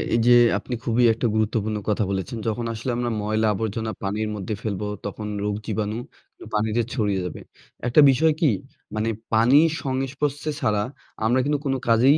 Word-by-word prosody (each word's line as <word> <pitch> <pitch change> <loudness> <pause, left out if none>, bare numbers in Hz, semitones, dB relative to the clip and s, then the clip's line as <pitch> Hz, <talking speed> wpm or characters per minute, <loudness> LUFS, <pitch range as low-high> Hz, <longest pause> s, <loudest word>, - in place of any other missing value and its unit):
এইযে 120 +1 +4 0.3
আপনি 125 - -6
খুবই 120 +1 +2
একটা 115 +2 -1
গুরুত্বপূর্ণ 110 0 0
কথা 105 +1 +1
বলেছেন। 100 +5 -3
যখন 115 +2 -1
আসলে 115 +3 -3
আমরা 120 0 -1
ময়লা 110 +1 +1
আবর্জনা 110 +1 -2
পানির 105 +2 -1
মধ্যে 105 +1 -4
ফেলবো 105 -1 -3 0.2
তখন 105 +1 -5 0.2
রোগ 105 0 -1
জীবাণু 110 0 -2 0.6
পানিতে 110 +2 +1
ছড়িয়ে 100 -6 0
যাবে। 90 - -6 0.5
একটা 135 +5 +6
বিষয় 155 +5 +3
কি? 150 -7 +5 0.4
মানে 110 +1 0 0.2
পানির 130 +9 +6
সংস্পর্শে 140 +3 -2
ছাড়া 105 -1 +1 0.4
আমরা 120 +3 +3
কিন্তু 145 -1 +1
কোন 135 - +1
কাজেই 125 +6 +5
110 Hz, 160 wpm, -24 LUFS, 105-130 Hz, 0.6 s, একটা